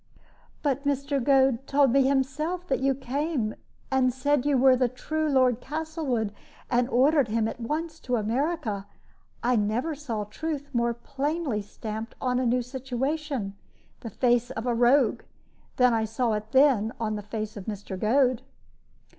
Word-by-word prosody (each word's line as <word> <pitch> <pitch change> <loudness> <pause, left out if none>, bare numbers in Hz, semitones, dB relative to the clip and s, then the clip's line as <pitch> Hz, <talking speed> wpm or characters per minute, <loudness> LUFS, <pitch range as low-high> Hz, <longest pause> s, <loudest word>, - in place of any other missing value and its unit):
"But 280 -2 0
Mr. 280 -1 0
Goad 270 -1 +3
told 280 -2 +4
me 275 +2 +5
himself 290 +6 -1
that 270 - +1
you 270 0 +2
came 265 -3 -2 0.4
and 260 -1 +3
said 275 +2 +1
you 285 -2 +3
were 260 0 +6
the 250 -1 +2
true 310 +5 -2
Lord 255 -3 +3
Castlewood, 295 -8 -2 0.4
and 245 0 +2
ordered 275 +2 +4
him 220 0 0
at 225 - -6
once 315 +7 -3
to 250 - -1
America. 225 - -1 0.6
I 245 +1 +3
never 220 +9 0
saw 255 -8 -4
truth 285 +6 -5
more 235 -1 +1
plainly 275 -1 -2
stamped 220 +2 -7
on 250 -1 0
a 255 - +1
new 245 +1 +2
situation 265 -2 -3 0.4
the 230 - -7
face 245 +2 +2
of 235 -3 -5
a 245 - +1
rogue 245 +1 +3 0.5
than 250 -1 +4
I 220 -1 +1
saw 225 +1 0
it 215 +1 -4
then 260 -6 +4
on 220 -2 -1
the 210 - -4
face 215 +1 -5
of 200 -3 -8
Mr. 200 -3 -5
Goad." 250 +3 +3
255 Hz, 160 wpm, -27 LUFS, 225-280 Hz, 0.6 s, were